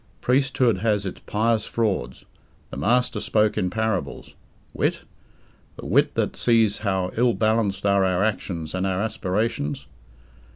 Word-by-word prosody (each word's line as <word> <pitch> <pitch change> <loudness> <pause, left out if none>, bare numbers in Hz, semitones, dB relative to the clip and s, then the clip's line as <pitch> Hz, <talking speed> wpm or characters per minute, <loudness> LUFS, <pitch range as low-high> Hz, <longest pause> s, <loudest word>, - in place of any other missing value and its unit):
Priesthood 130 -2 +2
has 105 -3 0
its 95 - -5
"pious 110 0 +1
frauds". 95 - -2 0.5
The - - -6
Master 125 - +1
spoke 105 -1 +1
in 90 - 0
parables. 105 -9 -3 0.4
Wit? - - 0 0.7
The - - -10
wit - - +2
that - - -1
sees 115 -3 +2
how 95 -3 -1
ill 120 0 +3
balanced 110 -3 0
are 100 -1 +3
our 95 0 +1
actions 90 -6 -3
and 95 +1 -1
our 95 -1 -1
aspirations? 100 -8 -2
105 Hz, 135 wpm, -23 LUFS, 95-115 Hz, 0.7 s, ill